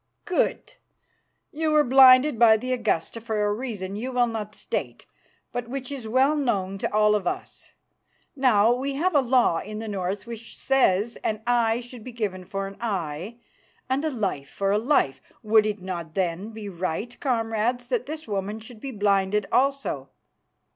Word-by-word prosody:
"Good. 370 +7 -1 0.8
You 315 +1 -1
were 305 -1 +5
blinded 260 0 +7
by 225 -2 +7
the 255 +3 -2
Augusta 225 -3 -1
for 220 -2 -1
a 205 - +1
reason 205 -5 -5
you 245 +5 -4
will 245 -1 +3
not 215 -2 -5
state, - - -4 0.5
but 245 -1 -4
which 265 +1 -5
is 260 -5 -6
well 265 +6 +3
known 195 -9 -1
to - - -2
all 210 0 +4
of 200 -4 0
us. - - -5 0.6
Now, 240 -5 +4
we 270 +3 -2
have 350 +6 +1
a 290 - +5
law 245 -9 +3
in 210 +1 -7
the 220 +1 -5
North 195 0 -3
which 230 -1 -9
says 235 -5 +2
that 215 - 0
an 215 - -19
eye 235 -1 +2
should 245 -2 -11
be 255 - -9
given 195 -5 -3
for 195 +2 -4
an 195 0 -8
eye 190 -1 -3 0.5
and 270 +3 +1
a 315 - +1
life 195 - -3
for 195 0 -1
a 205 - +3
life. 230 - +1 0.2
Would 215 0 +4
it 210 -3 -4
not 170 -4 -5
then 185 +2 -1
be 220 -2 -8
right, 185 +5 -4
comrades, 235 -1 -1
that - - -1
this 310 -1 -6
woman 205 +1 -3
should 225 +1 -11
be 275 - -6
blinded 205 -2 +1
also?" 270 - 0
225 Hz, 180 wpm, -25 LUFS, 200-255 Hz, 0.8 s, blinded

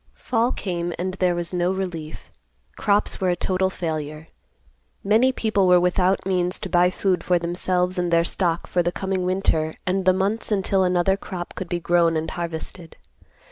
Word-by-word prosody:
Fall 235 0 0
came 175 -2 -3
and 185 +2 -3
there 180 -2 +1
was 175 +1 -2
no 180 0 +1
relief. 175 -5 -5 0.4
Crops 205 0 +1
were 185 - +2
a 175 - +2
total 190 +1 0
failure. 155 -3 -5 0.7
Many 225 +6 +4
people 215 -6 +1
were 180 0 +6
without 180 +2 +1
means 180 -1 +2
to - - -6
buy 180 0 +4
food 185 -1 -1
for 180 - +2
themselves 180 +1 -1
and 175 -1 0
their 170 0 +3
stock 170 -1 0
for 180 - 0
the 175 0 0
coming 190 0 -2
winter 165 -4 0
and 185 0 0
the 185 - +6
months 200 +5 -1
until 195 -1 +2
another 180 +1 +2
crop 180 -3 -7
could 185 - -6
be 175 - -1
grown 170 -1 +2
and 155 +1 -3
harvested. 170 0 -6
180 Hz, 180 wpm, -23 LUFS, 175-190 Hz, 0.7 s, were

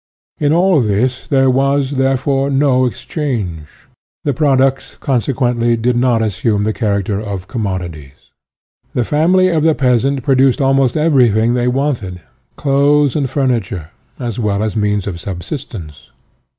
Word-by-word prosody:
In 145 -1 +1
all 175 -2 +3
this 120 +4 -1
there 135 -2 +3
was, 140 +1 +1
therefore, 135 0 0
no 135 -2 +2
exchange; 110 - -4 0.6
the 145 - 0
products, 135 -1 +1
consequently, 120 -2 0
did 120 +2 0
not 120 -2 +2
assume 105 0 0
the 110 +1 0
character 100 -3 -1
of 100 -3 -6
commodities. 90 - -6 0.6
The 125 - +1
family 180 +7 +3
of 165 -3 +1
the 160 0 +3
peasant 130 +1 +1
produced 135 +1 +3
almost 135 -1 +2
everything 120 -7 +3
they 125 0 0
wanted: 125 -9 -2 0.4
clothes 145 0 +2
and 140 -4 0
furniture, 110 - -2 0.3
as 120 -3 -4
well 105 -2 0
as 110 0 -3
means 105 -2 0
of 90 -4 -5
subsistence. 90 - -7
125 Hz, 135 wpm, -16 LUFS, 105-140 Hz, 0.6 s, all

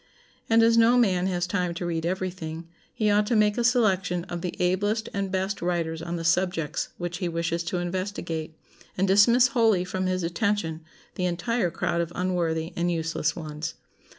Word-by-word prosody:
And 225 0 +5
as 230 0 +5
no 235 +2 +5
man 190 -6 +3
has 175 -2 0
time 180 -2 -1
to 175 - -4
read 165 -1 -1
every 185 +1 -1
thing, 165 -2 -7 0.2
he 215 -2 +1
ought 210 0 +3
to 235 - +1
make 210 -1 +3
a 240 - 0
selection 195 -8 +2
of 175 -1 -6
the 180 -1 -4
ablest 205 +5 0
and 195 -1 -2
best 190 +1 -2
writers 165 -2 -1
on 170 +1 -4
the 165 - -4
subjects 165 -2 0
which 175 0 -4
he 180 -3 -1
wishes 170 0 -1
to 180 +1 -2
investigate, 175 -3 -4 0.4
and 190 +1 +2
dismiss 235 +6 +5
wholly 225 -8 +3
from 185 0 -2
his 185 -1 -1
attention 170 -3 -1 0.3
the 180 - -2
entire 180 +3 0
crowd 170 +1 -1
of 170 0 -3
unworthy 170 -2 -1
and 175 +1 0
useless 165 -1 -1
ones. 155 -1 -5
180 Hz, 185 wpm, -26 LUFS, 170-205 Hz, 0.4 s, And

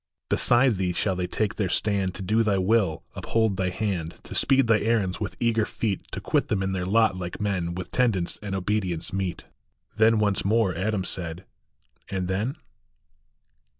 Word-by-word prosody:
Beside 120 -2 +4
thee 90 -1 0
shall 95 +1 0
they 90 0 -2
take 110 +4 -1
their 95 -4 0
stand, 100 -3 0
To 95 - -6
do 110 +5 +2
thy 105 -3 +2
will, 95 -3 +1
uphold 110 -3 0
thy 95 -1 0
hand, 90 -5 -3
To - - -8
speed 135 -1 +4
thy 115 -2 +4
errands 105 -4 0
with 95 -4 -4
eager 115 -2 +2
feet, 105 -2 -3
To - - -3
quit - - 0
them 95 -2 0
in 95 - -1
their 90 -1 -2
lot 110 0 +3
like 90 -1 -5
men, 95 -5 -1
With 90 0 -6
tendance 110 -9 +1
and 100 -2 -4
obedience 95 -4 -1
meet." 95 -2 -3 0.5
Then 110 +1 +4
once 105 -2 +1
more 105 -2 +2
Adam 100 +2 -1
said, 90 0 -4 0.3
" - - -33
And 95 -2 -2
then? 105 +9 -1
100 Hz, 185 wpm, -26 LUFS, 90-110 Hz, 0.5 s, Beside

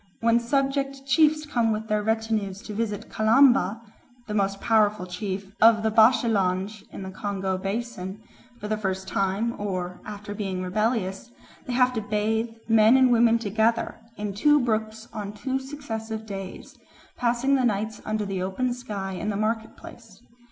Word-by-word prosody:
When 230 +1 +3
subject 275 +2 -1
chiefs 305 +2 +3
come 235 -6 +1
with 215 +1 -3
their 210 0 +1
retinues 220 -2 -1
to 215 - -7
visit 210 -1 -3
Kalamba 225 -2 +4 0.4
(the 210 - -5
most 195 -1 0
powerful 215 -3 +2
chief 190 +1 -5
of 220 -1 +6
the 220 - +1
Bashilange 215 -3 +3
in - - -7
the 190 - -6
Congo 190 -1 -2
Basin) 195 -1 -4 0.4
for 210 - -5
the 215 0 -1
first 190 -2 -3
time 195 +4 0
or 180 -3 -3
after 205 -1 -7
being 195 -3 -3
rebellious, 210 +1 -1 0.4
they 250 - -2
have 250 0 +3
to 225 - -2
bathe, 220 +2 0 0.2
men 225 +2 +6
and 260 -1 +5
women 230 -1 +5
together, 225 +1 0 0.2
in 205 -1 -3
two 295 +9 +4
brooks 220 -2 -2
on 205 -2 -5
two 265 +5 -2
successive 225 -6 -6
days, 195 -3 -8 0.4
passing 245 +3 +1
the 265 -2 +3
nights 215 -1 -1
under 215 -1 -2
the 195 -2 -3
open 215 +7 -1
sky 205 -6 -5
in 190 +3 -3
the 205 - -1
market 220 +1 -2
place. - - -13
215 Hz, 160 wpm, -25 LUFS, 200-235 Hz, 0.4 s, of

